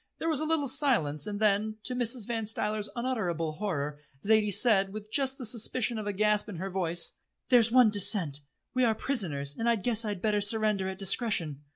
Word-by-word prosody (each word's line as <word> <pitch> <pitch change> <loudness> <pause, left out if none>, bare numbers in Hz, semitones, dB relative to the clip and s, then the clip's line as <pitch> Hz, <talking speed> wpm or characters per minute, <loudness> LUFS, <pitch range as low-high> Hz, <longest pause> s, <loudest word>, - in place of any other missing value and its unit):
There 325 - -3
was 310 -4 0
a 310 - -2
little 310 -3 0
silence, 155 - 0
and 205 -1 -5
then, 215 0 0
to 255 - 0
Mrs. 245 -2 0
Van 225 -2 -4
Stuyler's 210 -1 -3
unutterable 190 -11 -2
horror, 150 -8 -4 0.3
Zaidie 215 -1 +3
said, 195 -3 +3
with 215 +1 -9
just 270 0 +2
the 255 - -6
suspicion 230 +1 +1
of 210 - -6
a - - -1
gasp 210 +1 0
in 205 - -7
her 190 +3 -6
voice: 175 -2 +1 0.4
"There's 235 -3 +4
one 245 -3 +5
dissentient. 190 -8 +3 0.3
We 255 -1 +1
are 225 -2 +2
prisoners, 150 - -3
and 230 +1 -1
I 235 - +3
guess 225 +2 +1
I'd 205 -3 -4
better 210 -1 +1
surrender 210 -2 +1
at 190 0 -6
discretion." 190 - +2
215 Hz, 200 wpm, -28 LUFS, 190-235 Hz, 0.4 s, one